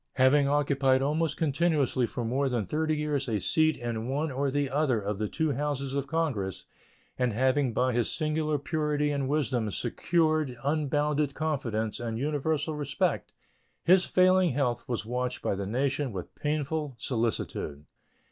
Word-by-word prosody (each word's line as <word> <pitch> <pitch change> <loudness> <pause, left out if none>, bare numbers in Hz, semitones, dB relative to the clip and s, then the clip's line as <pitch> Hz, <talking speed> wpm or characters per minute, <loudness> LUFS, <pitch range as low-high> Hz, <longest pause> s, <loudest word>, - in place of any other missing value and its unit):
Having 140 +2 +4
occupied 140 -2 +2
almost 155 +3 0
continuously 145 -5 +1
for 120 - -4
more 135 +4 +1
than 120 -4 0
thirty 155 - 0
years 150 -3 -1
a 110 -2 0
seat 155 +8 +2
in 120 -1 -3
one 145 +3 -1
or 135 +2 0
the 145 +1 0
other 135 -4 +1
of 100 0 -3
the 105 - 0
two 160 +6 -1
Houses 140 -1 -2
of 140 0 -1
Congress, 135 - -2 0.5
and 125 -3 +1
having 130 +3 +2
by 125 +3 +1
his 120 -2 +1
singular 155 -1 0
purity 150 0 0
and 140 -2 -1
wisdom 130 -7 0
secured 155 - 0
unbounded 150 -1 0
confidence 120 -9 -2
and 115 -2 -3
universal 150 +3 -1
respect, 145 -2 -1 0.5
his 180 +1 +5
failing 185 -3 +4
health 125 -4 -1
was 120 -3 -2
watched 125 +2 -3
by - - +1
the 100 0 -3
nation 135 +4 0
with 95 -4 -7
painful 150 -1 -2
solicitude. 110 - -2
140 Hz, 155 wpm, -28 LUFS, 125-150 Hz, 0.5 s, his